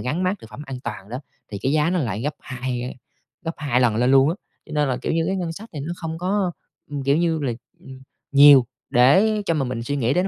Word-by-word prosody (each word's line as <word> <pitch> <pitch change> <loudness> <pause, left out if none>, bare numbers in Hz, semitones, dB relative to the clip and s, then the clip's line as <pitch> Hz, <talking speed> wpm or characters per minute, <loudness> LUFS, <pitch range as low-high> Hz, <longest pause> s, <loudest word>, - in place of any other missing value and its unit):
gắn 150 +8 -2
mác 185 +2 0
thực 110 - -13
phẩm 125 +7 -9
an 135 -2 -6
toàn 105 -4 -6
đó, 125 +3 -4 0.3
thì 100 - -3
cái 135 - +1
giá 155 +1 +2
nó 180 - +1
lại 110 - -2
gấp 150 +3 -2
2, 130 -2 -4
ơ, 125 - -4 0.6
gấp 165 0 -3
2 140 -5 +1
lần 120 -4 +3
lên 125 +3 +2
luôn 135 +1 +6
á. 165 - 0 0.3
Cho - - -11
nên 150 -2 +1
là, 130 - 0
kiểu - - -1
như, 165 0 +1
cái 190 +2 0
ngân 175 -3 -3
sách 215 +7 -10
thì 145 - -4
nó 155 +5 -4
không 165 -2 -5
có, 185 +1 0 0.4
ừm, 145 -1 -4
kiểu 140 +2 +3
như 165 -1 +1
là, 130 -4 0 0.3
ừm, 130 0 -12 0.3
nhiều 140 -2 +8 0.2
để 190 - +4
cho 165 - +2
mà 145 -4 0
mình 125 -2 -3
suy 145 +5 -2
nghĩ 130 -1 +1
đến 180 - +2
145 Hz, 270 wpm, -22 LUFS, 125-165 Hz, 0.6 s, nhiều